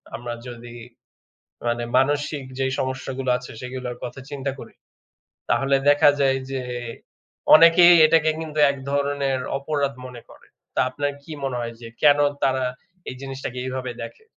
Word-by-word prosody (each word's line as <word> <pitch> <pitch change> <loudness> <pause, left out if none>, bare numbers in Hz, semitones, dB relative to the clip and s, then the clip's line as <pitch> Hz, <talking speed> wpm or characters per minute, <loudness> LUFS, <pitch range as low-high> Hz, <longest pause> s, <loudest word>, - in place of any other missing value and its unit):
আমরা 120 0 -5
যদি 120 -1 -10 0.9
মানে 120 0 -1
মানসিক 145 +1 0 0.2
যে 135 - +1
সমস্যাগুলো 130 0 -3
আছে 125 - -10
সেগুলোর 125 -1 -6
কথা 125 +2 -6
চিন্তা 140 -1 -3
করি। - - -11 0.8
তাহলে 135 0 +2
দেখা 145 0 +6
যায় 135 -1 +3
যে 135 -1 -3 0.9
অনেকেই 170 +2 +8
এটাকে 160 0 +3
কিন্তু 155 -1 -6
এক 140 - -4 0.2
ধরনের 140 -2 0 0.2
অপরাধ 140 0 -1
মনে 125 -1 -10
করে। - - -18 0.3
তা - - +1
আপনার 145 +2 -2
কি 155 - -10
মনে 135 -2 -2
হয় 115 -1 -5
যে 115 - -9
কেন 145 -1 +6 0.2
তারা 130 -1 +1 0.4
এই 130 - -6
জিনিসটাকে 135 -2 -6
এভাবে 130 -1 -4
দেখে? 280 - -10
135 Hz, 145 wpm, -23 LUFS, 125-145 Hz, 0.9 s, অনেকেই